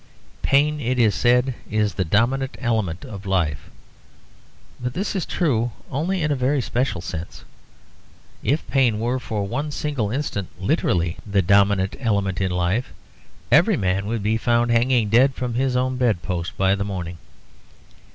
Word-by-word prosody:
Pain, 150 +2 +2
it 130 -2 -1
is 110 -4 +4
said, 125 +2 +3 0.2
is 105 -1 +1
the 95 - 0
dominant 125 - +1
element 110 - -1
of 100 -1 -8
life; 80 -6 -1 1.1
but 125 0 -4
this 200 +3 -2
is 185 - -2
true 120 -9 0 0.2
only 170 +6 -1
in 150 - +1
a - - +2
very 135 +2 +1
special 120 -6 -1
sense. 85 -1 -7 1.0
If 145 +4 0
pain 125 -6 +2
were 120 +3 0
for 110 -4 -3
one 140 +9 -3
single 145 -7 -2
instant 115 -7 -2
literally 85 -1 0
the 100 -2 +1
dominant 100 0 +3
element 100 -6 0
in 95 - +1
life, 90 +7 0 0.6
every - - +5
man 95 +1 0
would 110 -1 -2
be 110 +2 +1
found 120 +1 +1
hanging 120 -2 +3
dead 130 +5 +4
from 125 -2 -3
his 130 +1 0
own 130 0 0
bed 115 -8 +1
post 90 0 -4
by 95 0 +3
the 100 0 -1
morning. 90 -4 -5
115 Hz, 160 wpm, -22 LUFS, 95-130 Hz, 1.1 s, every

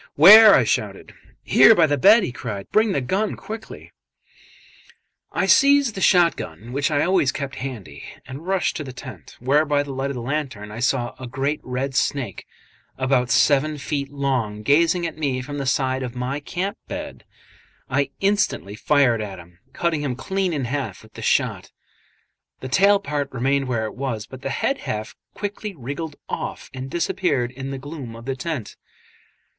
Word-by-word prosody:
"Where?" 210 +6 +10
I - - +4
shouted. - - -2 0.3
"Here 225 - +7
by 170 - +5
the 145 -1 +1
bed," 205 +8 +6
he 155 - -2
cried, 105 -5 -6
"Bring 215 0 +3
the 140 - 0
gun, 195 +11 -1
quickly." 220 +1 -9 1.4
I - - 0
seized 280 -3 +5
the 190 - -6
shot 175 -3 +5
gun, 105 +10 -8
which 145 +1 0
I 145 -2 +1
always 180 -7 +2
kept 140 -1 -5
handy, 105 - -7 0.2
and 140 +7 -9
rushed 190 -1 0
to 150 - -4
the 130 -3 -8
tent, 125 0 -11
where, 140 +5 +3
by 145 -2 +1
the 140 -1 -7
light 135 +1 -2
of 140 - -4
the 120 - -5
lantern, 130 -7 -4
I 110 - -7
saw 120 -1 0
a 130 - -7
great 135 +4 -2
red 130 +2 -3
snake, 130 - -2 0.5
about 130 -2 +1
seven 140 +5 +3
feet 140 -1 -3
long, 125 -7 -2
gazing 165 +7 +3
at 165 -2 -5
me 135 -4 -1
from 145 +3 -6
the 135 - -3
side 130 0 0
of 125 -1 -5
my 125 +3 -3
camp 185 +6 -4
bed. - - -7 0.6
I 140 +1 0
instantly 200 - 0
fired 120 -1 +2
at 100 -3 -6
him, 85 0 -15
cutting 160 0 -1
him 135 -4 -2
clean 190 +7 -2
in 145 -5 -2
half 135 +2 -4
with - - -18
the - - -9
shot; - - 0 0.9
the 130 - -6
tail 200 +8 +4
part 145 -7 -3
remained 135 +2 0
where 115 -3 -1
it 110 - -6
was, 125 -5 -4
but 130 +2 -11
the 135 - -3
head 275 - -1
half 110 - -5 0.2
quickly 205 0 -5
wriggled 145 +3 -6
off - - -5
and 130 0 -6
disappeared 150 -6 0
in 135 +1 -7
the 135 - -4
gloom 135 -4 -8
of 115 +1 -11
the 135 0 -2
tent. 140 -5 -5
140 Hz, 185 wpm, -22 LUFS, 125-165 Hz, 1.4 s, Where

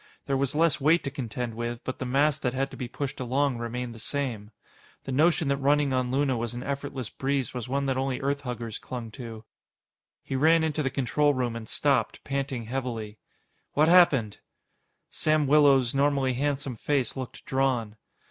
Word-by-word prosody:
There 140 - 0
was 135 +1 0
less 160 -2 +3
weight 160 +5 +4
to 135 - -3
contend 125 -3 -4
with, 120 +1 -4
but 130 - -5
the 130 - -3
mass 140 +3 +2
that 125 -3 -1
had 135 +1 -1
to - - -8
be 125 - -5
pushed 140 +3 -5
along 130 0 0
remained 120 +1 -4
the 115 - -11
same. 115 -5 -3 0.5
The 135 - -5
notion 160 +3 +3
that 140 - +2
running 140 0 +2
on 130 -1 0
Luna 135 -1 +1
was 120 0 -3
an 120 - -5
effortless 140 -4 -4
breeze 135 -1 -1
was 125 -1 -5
one 140 +1 0
that 135 -1 0
only 135 -1 -1
Earthhuggers 125 -5 -3
clung 120 -3 -6
to. 115 -2 -8 0.8
He 135 - -4
ran 160 +4 +4
into 155 -1 0
the 135 - 0
control 145 +2 +1
room 125 -2 -1
and 110 -1 -7
stopped, 135 -7 +1
panting 135 -3 -2
heavily. 115 -3 -4 0.5
"What... 150 +2 +4
happened?" 145 - +5 0.7
Sam 155 -1 +2
Willows' 140 -4 +5
normally 140 -1 +2
handsome 140 -1 -2
face 135 -1 0
looked 130 -2 -7
drawn. 130 -5 0
135 Hz, 180 wpm, -27 LUFS, 120-140 Hz, 0.8 s, happened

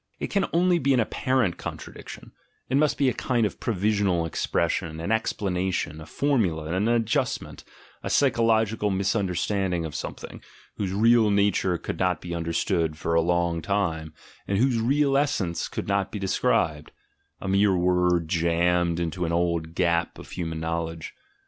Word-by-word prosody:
It - - -4
can 200 -1 +1
only 175 +1 +3
be 135 -1 +2
an - - +2
apparent 115 -3 0
contradiction; - - -8 0.4
it 135 - +2
must 150 0 +2
be 140 - +2
a 125 - +2
kind 120 -4 0
of 105 - -4
provisional 100 -5 +1
expression, 80 0 -1
an 85 +6 -3
explanation, 95 -7 -1
a 75 - -10
formula, 85 - 0
an 100 +4 +1
adjustment, 120 +2 -1 0.4
a - - -4
psychological 110 -5 +2
misunderstanding 95 -2 0
of 80 - -6
something, - - -7 0.4
whose 100 -3 -2
real 110 +2 +4
nature 100 -3 +2
could 80 - -6
not 90 -3 +1
be 85 - -6
understood 85 -1 -1
for 85 - -2
a 85 - +4
long 85 0 0
time, 85 -6 -1 0.4
and 100 - 0
whose 125 +1 +2
real 135 +4 +2
essence 105 - 0
could - - -5
not 100 -1 0
be - - -4
described; 80 -5 0 0.5
a - - -6
mere 100 0 +3
word 90 -1 +2
jammed 85 +1 +1
into 85 +1 -2
an 80 - -2
old 85 -1 -1
gap 85 -2 +1
of - - -12
human 80 -3 -4
knowledge. 80 0 -4
95 Hz, 155 wpm, -25 LUFS, 85-110 Hz, 0.5 s, real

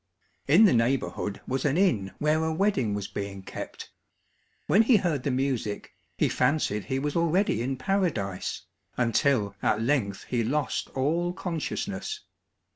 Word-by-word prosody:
In 175 +10 +7
the 200 - +5
neighbourhood 115 -4 0
was 130 0 -1
an 145 +1 +1
inn 115 - +2
where 155 +1 +1
a 160 - 0
wedding 160 - +1
was 100 -1 -3
being 100 -1 -6
kept; - - -8 0.7
when 205 - +5
he 230 +2 +5
heard 170 -8 0
the 140 - -1
music, 125 -5 -2 0.2
he - - +3
fancied 105 -9 +1
he 130 - -1
was 145 +2 -2
already 170 - +2
in 130 +2 -2
Paradise, 130 - -1 0.3
until 115 -3 +2
at 105 - +2
length 115 -6 0
he 120 -2 -1
lost 140 +5 -1
all 165 +6 0
consciousness. 190 - -4
135 Hz, 145 wpm, -27 LUFS, 110-170 Hz, 0.7 s, In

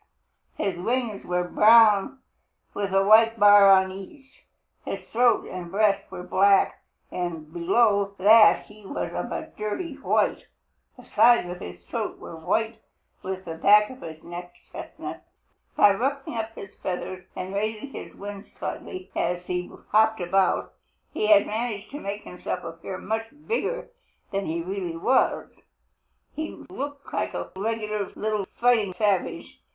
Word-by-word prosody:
His 195 -3 -2
wings 235 0 -2
were 180 0 0
brown 220 +5 +5 0.5
with 200 -1 -3
a 195 0 +3
white 225 +2 +5
bar 205 -1 +8
on 190 -1 +5
each. 265 +9 -13 0.4
His - - -5
throat 240 +1 +3
and 180 -2 -7
breast 200 +1 +1
were 180 - -7
black, 195 +2 +3 0.3
and 165 -3 -5
below 200 +3 +2
that 215 +3 +6
he 210 0 -16
was 195 - -4
of - - -4
a - - -5
dirty 250 - -4
white. 280 - 0 0.5
The - - -14
sides 240 -6 +4
of 180 - -7
his 85 0 -10
throat - - -4
were - - -10
white 220 +7 -1 0.4
and 190 0 -5
the 165 - -5
back 210 +6 +5
of 260 - -12
his 160 -1 -9
neck 175 +1 -9 0.2
chestnut. - - -8 0.5
By 205 - +6
ruffling 270 +4 -2
up 225 0 -4
his 195 - -10
feathers 185 0 -4
and 185 +1 -5
raising 215 +6 -3
his - - -9
wings 200 0 -8
slightly 370 0 -6
as 175 0 -1
he 180 0 -3 0.2
hopped 220 +1 +3
about, 185 +1 +1 0.4
he 210 - 0 0.2
managed 220 -1 -4
to 290 - -6
make 205 -2 -5
himself 180 - -5
appear 165 +3 -7
much 220 +3 -3 0.2
bigger 475 +2 -2 0.4
than 195 0 -2
he 165 +1 -2
really 180 -2 -4
was. 255 +10 +1 0.8
He 315 0 -6
looked 285 +1 -7
like - - -2
a - - -5
regular 210 0 -2
little 215 -2 -2
fighting 225 -6 +3
savage. 200 -3 -1
205 Hz, 145 wpm, -25 LUFS, 185-225 Hz, 0.8 s, bar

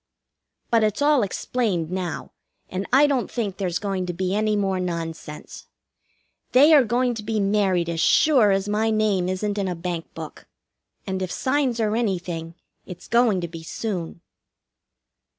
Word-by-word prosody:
But 230 -1 +4
it's 215 +6 0
all 290 -2 +4
explained 195 -4 -1
now, 185 -3 -4 0.4
and 185 +2 -4
I 270 +4 +6
don't 275 -4 0
think 205 -6 -3
there's 180 -4 -1
going 195 -3 -3
to 175 - -3
be 185 +2 -2
any 215 +1 +1
more 195 -2 0
nonsense. 165 -4 -6 0.9
They 290 +5 +7
are 290 -3 +7
going 245 +2 +1
to 225 - -6
be 215 +1 -2
married 195 -4 +1
as 170 -1 -3
sure 255 - +4
as 195 0 +1
my 215 +2 +1
name 210 -4 +1
isn't 205 +2 -2
in 195 - -1
a 180 - -2
bank 170 -1 -5
book; - - -9 0.6
and 190 -1 -3
if 185 -1 -3
signs 260 -1 0
are 215 -1 +1
anything, 175 -7 -2 0.3
it's 180 -1 -11
going 235 -5 +3
to 170 - -3
be 165 0 -9
soon. 170 -1 -5
200 Hz, 165 wpm, -23 LUFS, 180-225 Hz, 0.9 s, They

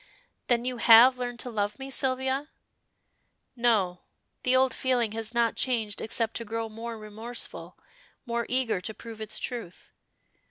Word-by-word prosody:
"Then 240 -1 +2
you 250 -1 -2
have 240 +3 +8
learned 245 -1 -3
to 245 - -6
love 205 -1 -1
me, 270 0 -7
Sylvia?" 265 +1 -1 1.1
"No, 215 -7 +2 0.4
the 255 0 +3
old 260 0 +4
feeling 245 -4 +1
has 225 0 -4
not 235 -1 +2
changed 225 -5 0
except 225 0 -1
to 230 - -4
grow 225 0 -4
more 225 +1 -6
remorseful, 220 +3 -5 0.5
more 235 -1 -2
eager 245 -7 +1
to 215 +3 -6
prove 225 -1 -10
its 215 - -3
truth. 230 -8 -6
235 Hz, 150 wpm, -28 LUFS, 220-250 Hz, 1.1 s, have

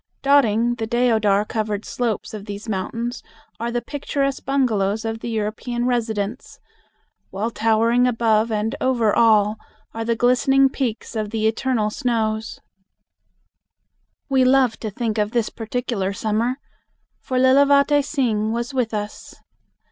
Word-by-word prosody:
Dotting 240 -4 +3
the 225 - -2
deodar 220 -4 +2
covered 215 -1 -3
slopes 235 -4 -3
of 210 -2 -7
these 205 +1 -7
mountains 230 +4 -3 0.4
are 235 +1 -2
the 240 0 -2
picturesque 275 -1 -2
bungalows 220 -6 0
of 225 0 -3
the 235 - -5
European 230 +2 -2
residents, 225 -2 -2 0.7
while 210 +5 -3
towering 230 +3 +2
above 225 -2 +2
and 220 +4 -1
over 235 -5 +2
all 215 -2 +4 0.4
are 225 - -4
the 230 0 0
glistening 265 +3 +3
peaks 245 -4 -4
of 215 -1 -2
the 220 0 -2
eternal 220 -1 0
snows. 220 -3 -2 1.7
We 265 -2 +3
love 255 -2 +4
to 220 - -4
think 220 +1 -2
of 210 +1 -1
this 235 -3 +1
particular 225 -4 -3
summer, 220 +4 -1 0.6
for 255 - -3
Lilavate 280 +2 +4
Singh 230 -7 0
was 235 +4 -3
with 240 -4 -1
us. 210 0 -6
230 Hz, 135 wpm, -21 LUFS, 215-250 Hz, 1.7 s, all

